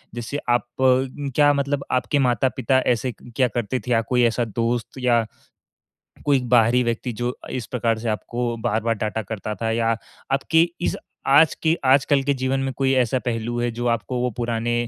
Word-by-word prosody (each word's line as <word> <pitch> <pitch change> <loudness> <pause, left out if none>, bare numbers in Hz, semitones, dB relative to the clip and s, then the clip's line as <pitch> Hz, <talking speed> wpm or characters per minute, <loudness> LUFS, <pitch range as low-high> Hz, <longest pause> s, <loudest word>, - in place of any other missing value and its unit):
जैसे 120 +4 -4
आप 120 0 +2 0.2
क्या 135 +2 +2
मतलब 140 0 -1
आपके 125 +2 +1
माता-पिता 130 +1 +2
ऐसे 125 0 0 0.2
क्या 130 -2 +3
करते 120 +2 -2
थे 125 - -6
या 115 -1 +4
कोई 125 +1 +1
ऐसा 120 +1 +2
दोस्त 115 +3 -2
या 120 -2 +2 1.0
कोई 140 -2 +4
बाहरी 120 +1 +5
व्यक्ति 120 +1 -2
जो 125 +1 -1
इस 125 -3 -4
प्रकार 115 -2 0
से 115 - -3
आपको 120 +2 -2
बार-बार 115 +2 0
डांटा 110 +1 -2
करता 105 0 -5
था 110 - 0
या 115 0 +1 0.4
आपकी 160 +5 +3
इस - - 0 0.3
आज 150 +3 +6
के 160 0 +3
आजकल 135 +1 +4
के 140 - +1
जीवन 130 0 -1
में 135 0 -1
कोई 135 -1 +2
ऐसा 125 +2 0
पहलू 120 0 -2
है 120 0 0
जो 120 +1 -4
आपको 115 +1 -1
वो 125 0 0
पुराने 120 0 -1
120 Hz, 175 wpm, -22 LUFS, 115-135 Hz, 1.0 s, आज